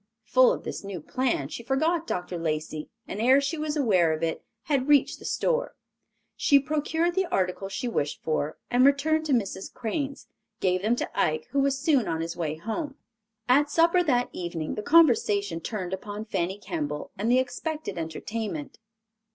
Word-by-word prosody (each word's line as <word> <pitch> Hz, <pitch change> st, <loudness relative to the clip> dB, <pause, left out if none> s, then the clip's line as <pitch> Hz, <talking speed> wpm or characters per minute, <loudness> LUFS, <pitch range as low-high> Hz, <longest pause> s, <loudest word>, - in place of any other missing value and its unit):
Full 255 Hz, +3 st, +5 dB
of -, -, -3 dB
this -, -, -5 dB
new 195 Hz, -3 st, -5 dB
plan, 235 Hz, -, -1 dB
she 235 Hz, -, -6 dB
forgot 315 Hz, +7 st, 0 dB
Dr. 180 Hz, -1 st, -3 dB
Lacey 155 Hz, -1 st, -3 dB, 0.2 s
and 205 Hz, -, -4 dB
ere 260 Hz, +4 st, +6 dB
she 280 Hz, +4 st, -1 dB
was 305 Hz, -1 st, -2 dB
aware 185 Hz, -, +3 dB
of 155 Hz, +1 st, -4 dB
it 165 Hz, -1 st, -1 dB, 0.2 s
had 275 Hz, -3 st, 0 dB
reached 290 Hz, -2 st, +4 dB
the -, -, -12 dB
store. -, -, 0 dB, 0.6 s
She 280 Hz, -, +5 dB
procured 310 Hz, +4 st, 0 dB
the 380 Hz, 0 st, +1 dB
articles 195 Hz, -, -1 dB
she 250 Hz, +5 st, -3 dB
wished 150 Hz, -11 st, -1 dB
for, 155 Hz, -1 st, -1 dB
and 245 Hz, +1 st, +4 dB
returning 285 Hz, +3 st, +4 dB
to 305 Hz, -, -1 dB
Mrs. 200 Hz, -6 st, -1 dB
Crane's, 275 Hz, +4 st, -4 dB, 0.3 s
gave 185 Hz, -1 st, +1 dB
them 220 Hz, +4 st, +2 dB
to -, -, -3 dB
Ike, 155 Hz, 0 st, 0 dB
who 280 Hz, -, +1 dB
was 275 Hz, 0 st, +2 dB
soon 275 Hz, -4 st, +2 dB
on 160 Hz, 0 st, -1 dB
his 165 Hz, +1 st, -4 dB
way 160 Hz, -3 st, -2 dB
home. 230 Hz, -, -4 dB, 0.5 s
At 285 Hz, +4 st, +4 dB
supper 335 Hz, +4 st, +4 dB
that 250 Hz, -7 st, +1 dB
evening 170 Hz, -3 st, -4 dB
the 210 Hz, -, -3 dB
conversation 210 Hz, -, +4 dB
turned 190 Hz, -2 st, -4 dB
upon 205 Hz, +2 st, -5 dB
Fanny 190 Hz, -2 st, -2 dB
Kemble 155 Hz, -7 st, -4 dB
and 210 Hz, +4 st, -1 dB
the 250 Hz, -, +5 dB
expected 260 Hz, -, -3 dB
entertainment. 165 Hz, +1 st, -5 dB
230 Hz, 175 wpm, -27 LUFS, 175-280 Hz, 0.6 s, ere